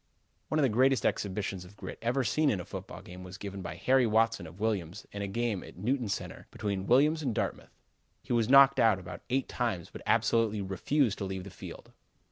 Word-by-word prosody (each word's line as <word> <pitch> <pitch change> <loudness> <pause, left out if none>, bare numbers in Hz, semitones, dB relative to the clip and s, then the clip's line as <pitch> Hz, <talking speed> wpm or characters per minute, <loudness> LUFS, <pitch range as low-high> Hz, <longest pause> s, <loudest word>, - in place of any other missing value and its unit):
One 155 - 0
of 155 - +3
the - - +5
greatest 130 +3 +3
exhibitions 95 -2 -1
of 95 +3 -15
grit - - -8
ever 125 +4 +1
seen 150 +4 +2
in 100 - 0
a 90 - -6
football - - -8
game 90 +1 -10
was 90 +1 -9
given 100 -1 -6
by - - -6
Harry 130 -2 +3
Watson 115 -4 +2
of 85 +4 -13
Williams 100 -4 -2
in 100 - -5
a 100 - -2
game 110 -1 -1
at - - -13
Newton 120 +3 -1
Center - - -5
between 100 -2 -3
Williams 150 +6 +4
and 130 -7 -1
Dartmouth. - - -3 0.5
He - - -3
was 115 -1 +2
knocked 135 0 +7
out 110 -4 +5
about 90 -2 -8
eight 130 +1 0
times 115 -9 -2
but - - -9
absolutely 115 -2 +2
refused 105 - 0
to 100 - -2
leave 95 -1 -4
the 100 - -9
field. - - -10
110 Hz, 215 wpm, -30 LUFS, 95-125 Hz, 0.5 s, knocked